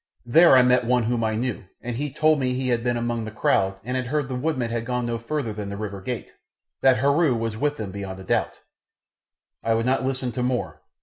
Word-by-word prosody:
There 145 Hz, +3 st, +7 dB
I 130 Hz, -, +7 dB
met 125 Hz, 0 st, +4 dB
one 125 Hz, 0 st, +2 dB
whom 115 Hz, 0 st, 0 dB
I 110 Hz, -1 st, 0 dB
knew, 120 Hz, -3 st, -3 dB
and 120 Hz, -1 st, -5 dB
he 145 Hz, +4 st, -2 dB
told 155 Hz, +2 st, +3 dB
me 125 Hz, -1 st, 0 dB
he 130 Hz, 0 st, -1 dB
had 120 Hz, -1 st, +1 dB
been 120 Hz, -1 st, 0 dB
among 120 Hz, -1 st, -2 dB
the 110 Hz, -, -5 dB
crowd 95 Hz, -3 st, +1 dB
and 125 Hz, +3 st, -3 dB
had 130 Hz, -1 st, -2 dB
heard 145 Hz, 0 st, -1 dB
the 130 Hz, -, -3 dB
woodmen 125 Hz, -3 st, -1 dB
had 115 Hz, -1 st, -2 dB
gone 125 Hz, 0 st, -2 dB
no 120 Hz, -1 st, -2 dB
farther 120 Hz, -1 st, -3 dB
than 105 Hz, -1 st, -5 dB
the 100 Hz, -, -5 dB
river 100 Hz, -2 st, -5 dB
gate, 120 Hz, +4 st, -5 dB, 0.5 s
that 130 Hz, -1 st, +5 dB
Heru 140 Hz, +1 st, +3 dB
was 115 Hz, -1 st, -2 dB
with 145 Hz, +5 st, -1 dB
them 105 Hz, -6 st, -5 dB
beyond 95 Hz, -1 st, -6 dB
a -, -, -9 dB
doubt. -, -, -1 dB, 1.0 s
I 115 Hz, 0 st, +2 dB
would 115 Hz, +1 st, 0 dB
not 130 Hz, +1 st, +1 dB
listen 130 Hz, -1 st, -2 dB
to 125 Hz, -, -3 dB
more. 125 Hz, 0 st, -2 dB
120 Hz, 240 wpm, -24 LUFS, 115-130 Hz, 1.0 s, There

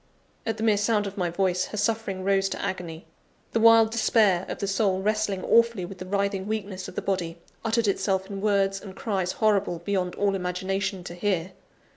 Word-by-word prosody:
At 225 Hz, -1 st, -1 dB
the 220 Hz, -, -4 dB
mere 215 Hz, -2 st, +4 dB
sound 210 Hz, 0 st, +1 dB
of 200 Hz, 0 st, -5 dB
my 180 Hz, -4 st, -1 dB
voice, 185 Hz, +1 st, 0 dB
her 210 Hz, -, -7 dB
suffering 205 Hz, -3 st, -1 dB
rose 195 Hz, 0 st, +2 dB
to -, -, -4 dB
agony; 170 Hz, -3 st, -4 dB, 0.5 s
the 230 Hz, -, +1 dB
wild 225 Hz, 0 st, +6 dB
despair 215 Hz, -5 st, +3 dB
of -, -, -4 dB
the -, -, -2 dB
soul 195 Hz, -1 st, +1 dB
wrestling 210 Hz, -2 st, 0 dB
awfully 230 Hz, -5 st, +3 dB
with 185 Hz, +1 st, -10 dB
the 185 Hz, -, -7 dB
writhing 200 Hz, 0 st, -1 dB
weakness 200 Hz, -3 st, -4 dB
of -, -, -10 dB
the -, -, -3 dB
body, 175 Hz, -4 st, -2 dB, 0.3 s
uttered 225 Hz, 0 st, +1 dB
itself 190 Hz, -1 st, 0 dB
in 195 Hz, -1 st, -6 dB
words 195 Hz, -2 st, +1 dB
and 190 Hz, -2 st, -10 dB
cries 190 Hz, -4 st, -2 dB
horrible, 205 Hz, -4 st, +1 dB
beyond 185 Hz, -3 st, -1 dB
all 200 Hz, -1 st, +1 dB
imagination, 190 Hz, +1 st, -2 dB
to 175 Hz, -, -7 dB
hear. 185 Hz, -1 st, -1 dB
195 Hz, 195 wpm, -26 LUFS, 185-215 Hz, 0.5 s, wild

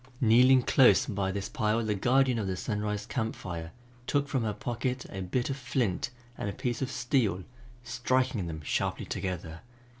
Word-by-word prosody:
Kneeling 125 Hz, +1 st, +6 dB
close 130 Hz, -1 st, +5 dB
by 100 Hz, -4 st, -1 dB
this 100 Hz, 0 st, -3 dB
pile 110 Hz, +2 st, 0 dB
the 105 Hz, -, +1 dB
guardian 125 Hz, +4 st, +3 dB
of 100 Hz, -, -2 dB
the 95 Hz, -1 st, -2 dB
Sunrise 105 Hz, -1 st, -2 dB
Camp 115 Hz, -3 st, -2 dB
Fire 85 Hz, -2 st, -6 dB, 0.4 s
took 145 Hz, -1 st, +1 dB
from 130 Hz, -4 st, 0 dB
her 110 Hz, -, 0 dB
pocket 125 Hz, +4 st, -3 dB
a 95 Hz, -, -5 dB
bit 120 Hz, +9 st, -1 dB
of 135 Hz, -, -3 dB
flint 120 Hz, -6 st, -1 dB, 0.3 s
and 100 Hz, -, -2 dB
a -, -, -4 dB
piece 120 Hz, +4 st, -3 dB
of 135 Hz, -, -1 dB
steel, 120 Hz, -8 st, 0 dB, 0.4 s
striking 125 Hz, -4 st, 0 dB
them 80 Hz, -1 st, -5 dB
sharply -, -, -1 dB
together. 85 Hz, -3 st, -4 dB
115 Hz, 175 wpm, -29 LUFS, 95-125 Hz, 0.4 s, Kneeling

